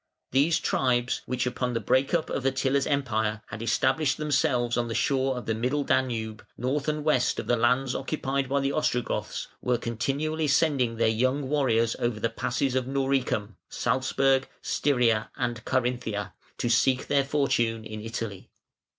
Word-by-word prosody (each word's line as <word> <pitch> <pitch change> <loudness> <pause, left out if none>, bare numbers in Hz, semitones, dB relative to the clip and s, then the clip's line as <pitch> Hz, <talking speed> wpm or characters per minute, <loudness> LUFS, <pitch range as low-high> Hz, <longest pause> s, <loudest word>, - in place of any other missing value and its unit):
These 145 +5 +3
tribes, 125 -2 +1
which 125 0 -1
upon 125 0 -2
the - - +1
break 130 +5 +2
up 170 -2 0
of 135 - -2
Attila's 135 +1 +1
Empire 110 -7 0
had 105 - -7
established 130 +5 +1
themselves 135 -5 +1
on 120 -1 0
the 115 - -4
shore 135 -1 +1
of 125 - -6
the 110 - 0
Middle 125 +6 0
Danube, 115 -5 -1
north 135 +4 -1
and 150 -1 -1
west 145 -5 +2
of - - -4
the 120 - +2
lands 125 +3 +2
occupied 135 -2 -2
by 140 +1 +1
the 135 0 0
Ostrogoths, 125 -5 -1
were 125 -1 +1
continually 145 +7 -1
sending 140 -5 +2
their 115 - +2
young 130 +5 +1
warriors 115 -6 +2
over 120 -3 -1
the 115 - 0
passes 125 +3 -1
of 130 -1 0
Noricum 135 -7 -1
(Salzburg, 135 +1 +1 0.2
Styria, 120 -6 +1
and 120 -2 -2
Carinthia) 120 -5 -1 0.3
to - - -1
seek 125 +2 +3
their 140 -1 +2
fortune 120 -6 0
in 110 0 -6
Italy. 110 -3 -5
130 Hz, 160 wpm, -27 LUFS, 115-140 Hz, 0.3 s, These